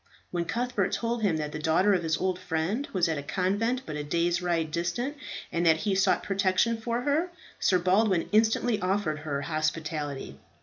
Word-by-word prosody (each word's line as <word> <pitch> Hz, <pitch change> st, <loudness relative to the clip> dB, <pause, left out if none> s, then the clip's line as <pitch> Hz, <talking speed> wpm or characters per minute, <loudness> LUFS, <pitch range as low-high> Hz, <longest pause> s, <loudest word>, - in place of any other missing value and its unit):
When 175 Hz, -1 st, -1 dB
Cuthbert 210 Hz, 0 st, -1 dB
told 235 Hz, 0 st, -1 dB
him 190 Hz, -7 st, +2 dB
that 150 Hz, -1 st, -3 dB
the 150 Hz, -, -5 dB
daughter 165 Hz, +6 st, +3 dB
of 185 Hz, -, +2 dB
his 160 Hz, -1 st, 0 dB
old 185 Hz, -1 st, -1 dB
friend 180 Hz, -, -2 dB
was 180 Hz, -3 st, +2 dB
at 160 Hz, -3 st, -1 dB
a -, -, -4 dB
convent 205 Hz, -, 0 dB
but 155 Hz, -, -5 dB
a 150 Hz, -, -3 dB
day's 170 Hz, +3 st, 0 dB
ride 165 Hz, -3 st, 0 dB
distant, 175 Hz, -, -2 dB, 0.4 s
and 170 Hz, -, 0 dB
that 160 Hz, -1 st, +6 dB
he 205 Hz, -, +2 dB
sought 190 Hz, 0 st, +2 dB
protection 195 Hz, +3 st, +1 dB
for 235 Hz, +1 st, -1 dB
her, 295 Hz, +7 st, +1 dB, 0.3 s
Sir 185 Hz, -, +3 dB
Baldwin 185 Hz, 0 st, +2 dB
instantly 220 Hz, +1 st, +3 dB
offered 185 Hz, -5 st, 0 dB
her 145 Hz, -2 st, -3 dB
hospitality. 155 Hz, -2 st, -3 dB
180 Hz, 185 wpm, -28 LUFS, 160-215 Hz, 0.4 s, that